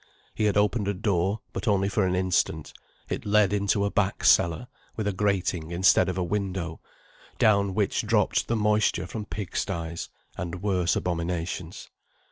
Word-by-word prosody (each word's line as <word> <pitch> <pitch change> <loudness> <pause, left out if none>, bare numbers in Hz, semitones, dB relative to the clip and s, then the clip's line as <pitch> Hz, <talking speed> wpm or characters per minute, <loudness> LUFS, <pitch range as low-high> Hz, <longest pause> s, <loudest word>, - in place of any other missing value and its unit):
He 110 - -1
had 105 -1 +2
opened 105 0 +1
a 100 - 0
door, 100 0 0
but - - -5
only 100 -2 +2
for 100 -1 +1
an 90 - 0
instant; 90 -3 0 0.3
it - - -4
led 105 -1 +3
into 100 0 +1
a 100 - -1
back 100 -1 0
cellar, 85 +9 +4 0.3
with 110 -2 -2
a 105 - 0
grating 95 -5 -1
instead 90 +1 +4
of 90 - -3
a 90 - 0
window, 95 -3 -3 0.6
down 100 -3 +3
which 105 -2 +1
dropped 110 -3 +2
the 115 - 0
moisture 105 -4 +1
from 105 +3 -6
pigsties, 85 -4 -4 0.3
and 90 +1 -5
worse 90 -4 +1
abominations. 85 0 -3
95 Hz, 160 wpm, -26 LUFS, 90-105 Hz, 0.6 s, cellar